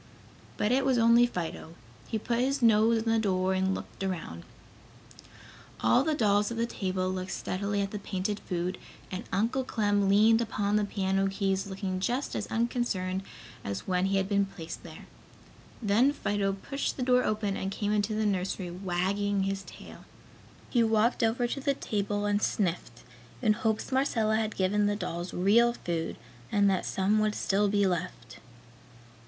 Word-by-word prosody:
But 210 - +1
it 265 +2 +3
was 260 -2 +2
only 235 +1 +6
Fido. 170 -5 -5 0.3
He 220 - -2
put 235 +2 -1
his 265 +1 0
nose 225 0 +4
in 225 - -1
the 225 - +3
door 190 -3 +1
and 190 0 +1
looked - - -8
around. 165 - -4 1.4
All 115 - +4
the 310 0 0
dolls 205 -4 +2
at 235 - -5
the 230 - +1
table 185 -5 -2
looked 185 0 -4
steadily 200 +2 -2
at 195 0 -2
the 210 - -4
painted 200 +1 -3
food, 180 0 -3 0.3
and 185 - -5
Uncle 230 +6 +1
Clem 205 -4 +1
leaned 220 +3 +5
upon 210 -2 -1
the 210 -1 +2
piano 195 -1 0
keys 195 0 -1
looking 190 -1 -3
just 245 +8 -1
as 210 - -3
unconcerned 225 -6 -1 0.4
as 100 0 -5
when 185 0 +1
he 195 0 +1
had 190 0 0
been 200 -1 +2
placed 170 -3 -8
there. - - -11 0.8
Then 225 +7 +3
Fido 200 -7 -1
pushed 275 +8 -3
the 255 - -1
door 250 0 +3
open 210 -2 -1
and 190 - -3
came 205 +1 -2
into 210 0 0
the 215 0 0
nursery 190 -2 -1
wagging 195 +2 -1
his 195 0 -2
tail. - - -12 0.7
He 240 - +3
walked 225 +2 +2
over 230 +2 +2
to 240 +3 -2
the 275 0 +1
table 205 -2 -2
and 205 0 +1
sniffed, 170 - -2 0.4
in 220 -4 +3
hopes 220 +2 -1
Marcella 230 -5 +2
had 220 -1 -2
given 205 +2 +2
the 205 - +1
dolls 175 -3 -4
real 225 +6 +4
food 170 -7 -3 0.4
and 205 -1 +3
that 190 - -1
some 200 +3 +1
would 215 0 +1
still 205 +1 +1
be 205 0 +2
left. 165 -10 -3
205 Hz, 170 wpm, -29 LUFS, 190-225 Hz, 1.4 s, only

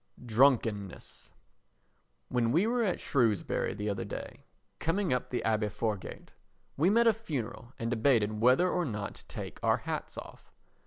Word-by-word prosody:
Drunkenness 115 -5 +1 1.0
When 120 -2 +1
we 170 - +3
were 240 +2 +1
at 195 -6 0
Shrewsbury 115 - +1
the 105 0 -4
other 100 -2 -1
day, - - -8 0.3
coming 175 -1 0
up 125 - -2
the 125 - -2
Abbey 110 -1 +1
Foregate, 105 -1 -4 0.4
we 160 +6 +3
met 230 +3 +4
a 230 - +6
funeral 130 - -5
and 115 +1 -3
debated 110 -3 +2
whether 130 +9 +5
or 180 0 0
not 105 -9 -4
to - - -13
take - - -7
our - - +3
hats - - -5
off. - - -10
120 Hz, 155 wpm, -30 LUFS, 110-165 Hz, 1.0 s, a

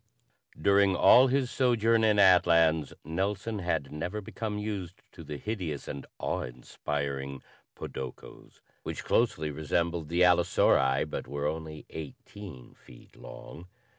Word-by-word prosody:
During 100 +2 +4
all 125 +8 +7
his 130 -1 0
sojourn 115 -3 +2
in 105 -1 +3
Atlans, 85 -5 +4
Nelson 100 +6 -2
had 80 -6 -2
never 85 +7 -4
become 105 +1 -5
used 100 -4 -5
to - - -12
the 75 - -6
hideous 85 - -4
and 70 - -7
awe - - -2
inspiring 70 +2 -5 0.3
podokos 65 -1 -9 0.2
which - - -6
closely 80 -10 +1
resembled 80 +2 -2
the 85 +1 0
allosauri 70 -6 +3
but - - -5
were 70 0 -4
only 80 0 -4
eighteen 80 -1 -10
feet - - -18
long. 85 +3 -11
85 Hz, 125 wpm, -29 LUFS, 75-105 Hz, 0.3 s, all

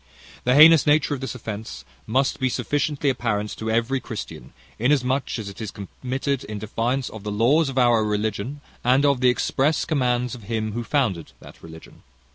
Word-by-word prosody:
"The 125 +1 +3
heinous 155 +1 +8
nature 145 0 +3
of 135 - -4
this 135 - -5
offence 105 - -7 0.2
must 130 +4 +1
be 130 - +1
sufficiently 145 +4 -1
apparent 105 -4 -2
to 110 - -4
every 115 +4 +1
Christian, - - -8 0.3
inasmuch 130 +1 +1
as 110 -3 -6
it 100 +2 -9
is 110 - -4
committed 130 +8 -4
in 105 0 -6
defiance 120 +5 -2
of 110 - -9
the 105 - -4
laws 135 +9 +3
of 135 - -6
our 120 -3 +4
religion, 105 +6 -2 0.2
and 130 +4 +3
of 140 -3 +2
the 125 - +5
express 135 +4 +1
commands 125 -5 0
of 120 -5 -9
Him 110 0 -2
who 120 +3 -4
founded 110 - -1
that - - -15
religion. 80 0 -13
125 Hz, 180 wpm, -23 LUFS, 110-135 Hz, 0.3 s, heinous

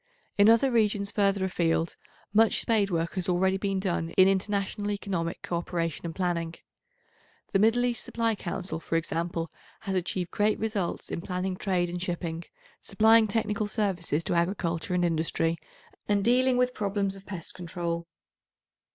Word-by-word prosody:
In 205 +1 +6
other 230 +4 +5
regions 210 -3 +1
further 200 -2 +2
a - - +1
field, 165 -1 0 0.4
much 220 +1 +5
spade 215 -4 +2
work 165 -2 -1
has 185 0 -2
already 190 +2 +2
been 195 -1 -1
done 175 -4 -1
in 190 0 +8
international 200 +1 0
economic 190 -5 -3
co 170 - -2
operation 170 -1 -3
and 165 - -6
planning. 170 -3 -1 1.0
The 195 - +4
Middle 225 +4 +4
East 240 -2 -1
Supply 230 -1 0
Council, 185 -3 -4
for 165 - -3
example, 165 0 -2 0.3
has 195 -3 -3
achieved 185 -1 -2
great 210 +1 +2
results 210 -5 -2
in - - -3
planning 185 +1 -2
trade 180 -2 0
and 175 0 -5
shipping, 170 -2 -3 0.3
supplying 220 0 +4
technical 210 0 -1
services 185 -7 -1
to - - -1
agriculture 170 0 0
and 175 -1 +2
industry 165 0 0 0.5
and 205 -1 +2
dealing 250 +1 +4
with 250 0 +2
problems 200 -2 -1
of 195 0 -14
pest 175 -5 -5
control. 170 -1 -4
190 Hz, 160 wpm, -28 LUFS, 170-210 Hz, 1.0 s, in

